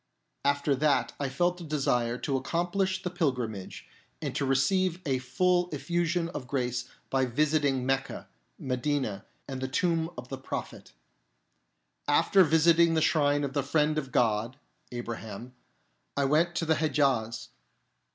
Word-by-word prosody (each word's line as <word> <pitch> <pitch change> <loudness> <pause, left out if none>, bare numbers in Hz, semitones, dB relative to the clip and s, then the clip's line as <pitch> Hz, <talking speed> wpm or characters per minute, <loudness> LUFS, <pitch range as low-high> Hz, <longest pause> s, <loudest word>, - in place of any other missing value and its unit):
1 140 - +4
After 140 0 0
that 135 -5 +2
I 140 -2 -1
felt 175 +6 0
a - - -6
desire 125 -6 0
to 135 0 -1
accom 170 +5 -2
plish 190 -1 0
the 180 - -2
Pilgrimage, 125 - -3 0.3
and - - -4
to 140 - 0
receive 175 +7 +2
a 135 -3 +1
full 180 +7 +1
effusion 175 -1 -1
of 145 -7 -6
grace 125 -2 -2 0.2
by 135 -1 +2
visiting 140 0 +1
Mecca, 135 0 -2 0.3
Medina, 125 -5 -2 0.2
and 130 -1 -5
the 130 - -1
Tomb 165 +3 0
of 125 0 -8
the 135 - -5
Prophet. 130 - -6 1.1
After 195 -1 +5
visiting 165 +1 +4
the - - +3
shrine 145 -2 +2
of 140 -1 -3
the 140 - +1
Friend 150 +2 +1
of 135 -3 -7
God 115 +1 +1 0.3
(Abraham), 120 -1 -6 0.6
I 140 - +2
went 165 +5 +2
to 165 - 0
the 160 -1 +2
Hedjaz. 135 -7 0
140 Hz, 150 wpm, -28 LUFS, 130-165 Hz, 1.1 s, After